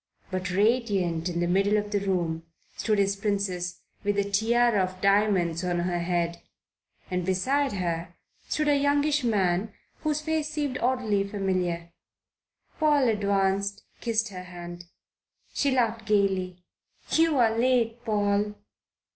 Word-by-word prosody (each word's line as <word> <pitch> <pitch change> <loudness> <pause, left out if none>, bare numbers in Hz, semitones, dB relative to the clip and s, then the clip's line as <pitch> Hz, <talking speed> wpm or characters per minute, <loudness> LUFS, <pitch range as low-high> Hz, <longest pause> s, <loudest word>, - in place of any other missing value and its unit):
But 185 0 -2
radiant 195 -5 +1
in 170 0 -2
the 175 - +1
middle 200 +4 +3
of 205 0 -2
the 205 - +1
room 170 -4 -1 0.3
stood 215 -2 0
his 200 0 +2
Princess, 195 -3 -2 0.2
with 205 0 0
a 200 - +3
tiara 220 +3 +2
of 185 0 -3
diamonds 195 -4 +2
on 175 -1 0
her 175 0 -1
head, 170 -1 -1 0.7
and 180 0 0
beside 260 +10 +1
her 170 -2 -3 0.3
stood 305 0 0
a 290 - +4
youngish 285 +1 +2
man 200 -2 +1 0.3
whose 305 -1 0
face 310 0 -1
seemed 295 -4 -2
oddly 235 -5 +1
familiar. 185 -4 -2 0.9
Paul 295 -5 +4
advanced, 200 -1 0 0.2
kissed 225 -2 0
her 180 -2 -8
hand. 175 -1 -9 0.7
She 280 - +1
laughed 230 -4 0
gaily. 190 -3 +1 0.5
"You 325 -2 +3
are 225 -3 +3
late, 240 -1 +1
Paul." 210 -1 0
200 Hz, 135 wpm, -27 LUFS, 180-235 Hz, 0.9 s, a